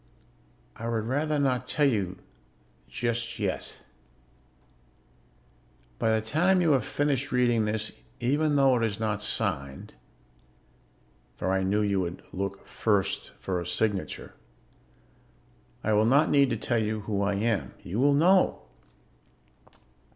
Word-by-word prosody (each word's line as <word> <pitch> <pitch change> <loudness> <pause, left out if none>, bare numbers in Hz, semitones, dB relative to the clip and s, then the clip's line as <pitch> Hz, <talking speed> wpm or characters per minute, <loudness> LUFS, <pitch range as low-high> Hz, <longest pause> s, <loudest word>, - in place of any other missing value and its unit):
I 115 +1 -5
would 110 -2 -1
rather 150 +5 0
not 130 -3 0
tell 150 +2 +2
you 100 -8 0 0.7
just 120 0 -2
yet. - - -4 2.2
By - - +1
the 110 0 +1
time 175 +10 +3
you 170 -3 +3
have 130 -6 +2
finished 145 -1 0
reading 120 -3 +2
this, 110 +1 -2 0.3
even 145 +5 +1
though 135 -2 +5
it 115 - 0
is 110 -2 -1
not 105 -2 -1
signed 75 -12 -2 1.4
(for 95 - -2
I 95 0 +1
knew 100 +3 +1
you 100 -2 +1
would 85 0 -5
look 100 +1 -4
first 100 -4 -1
for 90 -2 -2
a 85 - -6
signature), 95 -2 -2 1.5
I 110 - +1
will 105 +1 +4
not 140 +5 +4
need 140 -2 +4
to - - -1
tell 120 -2 0
you 110 0 -2
who 100 -1 -2
I 100 0 +1
am. 110 0 -1
You 100 +6 -4
will 140 +2 +4
know. 180 +5 +3
110 Hz, 135 wpm, -27 LUFS, 100-135 Hz, 2.2 s, though